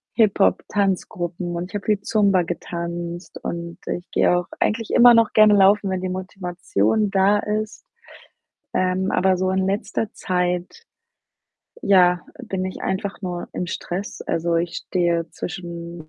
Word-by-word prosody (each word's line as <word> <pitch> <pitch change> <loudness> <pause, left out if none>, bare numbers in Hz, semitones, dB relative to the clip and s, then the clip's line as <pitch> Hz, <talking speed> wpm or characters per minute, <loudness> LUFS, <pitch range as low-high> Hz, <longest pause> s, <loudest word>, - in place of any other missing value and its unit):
Hip-Hop-Tanzgruppen 190 -4 0
und 175 +2 -4
ich - - -8
habe 205 - -4
viel 210 -2 +1
Zumba 200 -4 +3
getanzt 170 0 -5
und 170 0 -5
ich 175 - -4
gehe 180 - +3
auch 175 0 -1
eigentlich 225 0 0
immer 245 0 +8
noch 230 -1 +4
gerne 215 -1 +7
laufen, 200 0 +4
wenn 185 -1 -2
die 185 - -2
Motivation 185 - -1
da 195 +1 +4
ist. 215 +1 -3 0.9
Ähm, 185 +1 0
aber 190 0 +3
so 185 +1 0
in 190 0 +1
letzter 210 +2 -2
Zeit, 180 - -2 1.0
ja, 180 -3 +4 0.2
bin 190 -5 -3
ich 185 - -5
einfach 195 +2 -3
nur 175 -1 -4
im 180 - -3
Stress. 180 +3 -5
Also, 170 0 0
ich 170 0 -1
stehe 170 -2 +1
zwischen 170 -2 -7
185 Hz, 140 wpm, -22 LUFS, 175-200 Hz, 1.0 s, immer